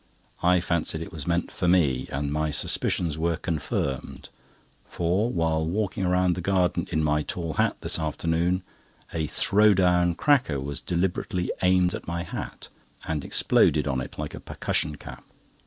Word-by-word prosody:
I 90 +1 +4
fancied 85 -2 -1
it - - -10
was 75 -4 -6
meant 85 0 0
for 90 - -2
me, 75 -8 +2
and 70 +1 -2
my 75 0 0
suspicions 75 +2 0
were 85 0 +1
confirmed; 70 -4 -3 0.6
for 90 +7 0
while 80 -3 +1
walking 95 +2 -1
round 90 0 +3
the 90 - -4
garden 90 -1 +1
in 80 - +1
my 75 0 +2
tall 85 +1 -4
hat - - +1
this - - 0
afternoon, 85 +3 0 0.5
a 80 -2 -1
"throw 105 +5 +3
down" 90 -2 +3
cracker 125 - +2
was 70 +1 -4
deliberately 90 0 -1
aimed 90 -1 +3
at - - -6
my 85 0 -2
hat, 85 - -7 0.4
and 75 -3 -2
exploded - - +3
on 65 -1 0
it - - -8
like - - -4
a - - -7
percussion 75 - -2
cap. 60 -3 -11
85 Hz, 160 wpm, -26 LUFS, 75-90 Hz, 0.6 s, I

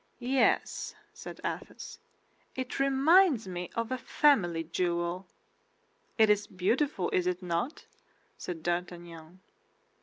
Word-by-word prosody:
"Yes," 260 - +1 0.2
said 455 +1 -9
Athos, - - -6 0.6
"it 260 0 -4
reminds 275 - +4
me 180 -1 -5
of 230 +1 -2
a 255 - -1
family 190 - +2
jewel." 175 +2 -2 0.9
"It 220 -1 +6
is 210 0 +2
beautiful, 200 +3 0
is 180 -1 +1
it 180 0 -2
not?" 175 - -3 0.5
said 165 -3 -7
D'Artagnan. 175 0 -5
185 Hz, 110 wpm, -30 LUFS, 175-260 Hz, 0.9 s, It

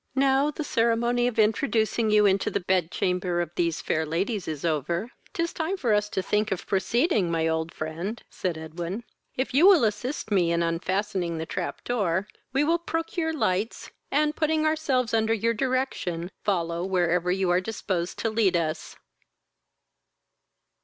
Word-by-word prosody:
"Now 270 +1 +3
the 305 +1 -4
ceremony 235 -1 +2
of 245 - -3
introducing 220 0 +2
you 210 0 +5
into 195 -1 +3
the - - -1
bed 180 -2 +1
chamber 180 -1 0
of 175 -2 -2
these 170 -2 0
fair 160 - 0
ladies 180 +6 -2
is 155 0 -4
over, 170 - -1 0.2
'tis 335 0 -2
time 340 +4 -2
for 235 - +1
us 210 0 +1
to 190 -3 -2
think 210 +2 0
of 190 - -2
proceeding, 205 - +1
my 165 -1 +1
old 160 0 -1
friend, 170 +8 -5
(said 180 -4 -3
Edwin.) 170 +7 -5 0.3
If 260 +1 -2
you 310 +8 +6
will 375 -9 +7
assist 220 +3 -2
me 175 -4 +3
in 170 0 +1
unfastening 180 +1 -1
the 160 - -3
trap 175 +2 -4
door, 200 -5 0 0.2
we 270 +2 +2
will 335 +3 +2
procure 330 0 -2
lights, 215 -7 -1 0.2
and, 300 +1 +1
putting 310 0 +1
ourselves 275 -7 +1
under 225 0 +2
your 230 +2 +1
direction, 220 -9 -2
follow 170 -3 0
wherever 180 -1 +1
you 185 -1 +1
are 180 +1 +3
disposed 185 -4 -3
to 225 - -1
lead 205 -5 +3
us. 160 -1 -3
205 Hz, 165 wpm, -26 LUFS, 175-245 Hz, 0.3 s, will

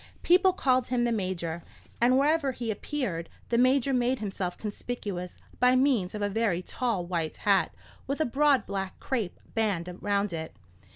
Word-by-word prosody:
People 370 +2 +5
called 260 -8 +2
him 245 -1 +1
the 240 - +1
Major; 185 -5 -2 0.4
and 250 +2 +5
wherever 285 -1 +2
he 235 -2 -3
appeared, 205 - -3 0.2
the 235 - +2
Major 265 +1 +3
made 250 +1 +2
himself 195 -4 -4
conspicuous 205 -4 -5 0.2
by 250 0 +5
means 255 -8 +2
of 210 - -3
a - - +2
very 200 -4 0
tall 230 -7 -1
white 170 -3 -2
hat, 200 -2 +2 0.4
with 275 +2 -2
a 315 - +2
broad 275 -1 +3
black 195 -1 -4
crape 225 -9 -2
band 185 -6 -1
round 205 -2 0
it. 160 -1 -5
225 Hz, 165 wpm, -28 LUFS, 185-255 Hz, 0.4 s, People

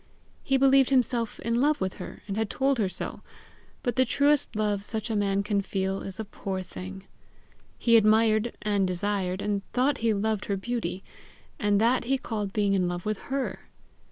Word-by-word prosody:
He 270 - +2
believed 270 0 +5
himself 245 -4 +1
in 235 +1 0
love 295 +2 +3
with 190 0 -2
her, - - -9
and 195 - -3
had 220 -1 -1
told 270 -1 +1
her 200 -4 +1
so; - - -6 0.6
but 245 -1 -1
the 260 - +6
truest 285 +2 +2
love 210 -2 0
such 220 +2 -4
a - - 0
man 200 -1 +1
can 205 -1 +1
feel, 195 0 -2
is 195 +2 -7
a 220 - -3
poor 190 -2 -4
thing. 190 +1 -8 0.7
He 230 -1 +4
admired, 220 +1 +4
and 205 -2 +1
desired, 185 0 -1
and 205 -1 0
thought 260 +3 +2
he 230 0 +2
loved 210 0 0
her 200 - -1
beauty, 195 -3 -3 0.6
and 205 -1 +2
that 235 +2 +2
he 270 +2 +2
called 215 -6 -4
being 205 -1 +1
in 185 -2 +2
love 175 0 -4
with 215 -1 -1
HER! 270 0 -2
215 Hz, 185 wpm, -27 LUFS, 195-240 Hz, 0.7 s, the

